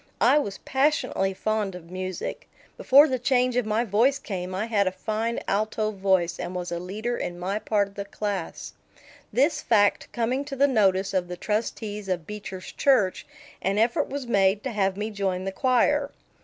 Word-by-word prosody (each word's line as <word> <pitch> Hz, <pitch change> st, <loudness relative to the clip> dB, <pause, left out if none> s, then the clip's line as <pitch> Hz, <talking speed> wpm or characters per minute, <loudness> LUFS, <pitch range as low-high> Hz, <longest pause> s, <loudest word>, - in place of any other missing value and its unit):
I 300 Hz, -, +5 dB
was 200 Hz, -9 st, -4 dB
passionately 265 Hz, -9 st, 0 dB
fond 215 Hz, -2 st, -1 dB
of 170 Hz, -1 st, -11 dB
music. 185 Hz, -1 st, -5 dB, 0.3 s
Before 295 Hz, -, +6 dB
the 260 Hz, -3 st, -1 dB
change 250 Hz, 0 st, +2 dB
of 250 Hz, -3 st, +1 dB
my 215 Hz, +2 st, +1 dB
voice 235 Hz, +7 st, +3 dB
came 185 Hz, -5 st, -5 dB
I 200 Hz, +3 st, -1 dB
had 205 Hz, -4 st, +1 dB
a -, -, +1 dB
fine 220 Hz, +4 st, -2 dB
alto 215 Hz, +1 st, 0 dB
voice 190 Hz, -4 st, +1 dB
and 180 Hz, -, -5 dB
was 180 Hz, -1 st, -4 dB
a 170 Hz, -, -2 dB
leader 215 Hz, +7 st, -3 dB
in 175 Hz, -, -4 dB
my 190 Hz, +4 st, -2 dB
part 205 Hz, -2 st, +1 dB
of -, -, -21 dB
the 200 Hz, 0 st, -5 dB
class. 200 Hz, -3 st, -4 dB, 0.6 s
This 285 Hz, +6 st, +2 dB
fact 205 Hz, -3 st, +2 dB
coming 245 Hz, +4 st, -1 dB
to 280 Hz, -1 st, -6 dB
the 280 Hz, +1 st, +4 dB
notice 195 Hz, -6 st, +2 dB
of 185 Hz, -2 st, 0 dB
the 180 Hz, 0 st, -6 dB
trustees 210 Hz, -1 st, -3 dB
of 175 Hz, -3 st, -1 dB
Beecher's 195 Hz, -2 st, -7 dB
church, 230 Hz, -10 st, +2 dB, 0.3 s
an 195 Hz, +2 st, 0 dB
effort 235 Hz, +7 st, +2 dB
was 280 Hz, -1 st, -4 dB
made 200 Hz, -3 st, +2 dB
to 260 Hz, -, -3 dB
have 195 Hz, -3 st, 0 dB
me 215 Hz, +2 st, -3 dB
join 190 Hz, -3 st, -2 dB
the 195 Hz, -, -3 dB
choir. 265 Hz, +6 st, +2 dB
210 Hz, 185 wpm, -25 LUFS, 190-240 Hz, 0.6 s, Before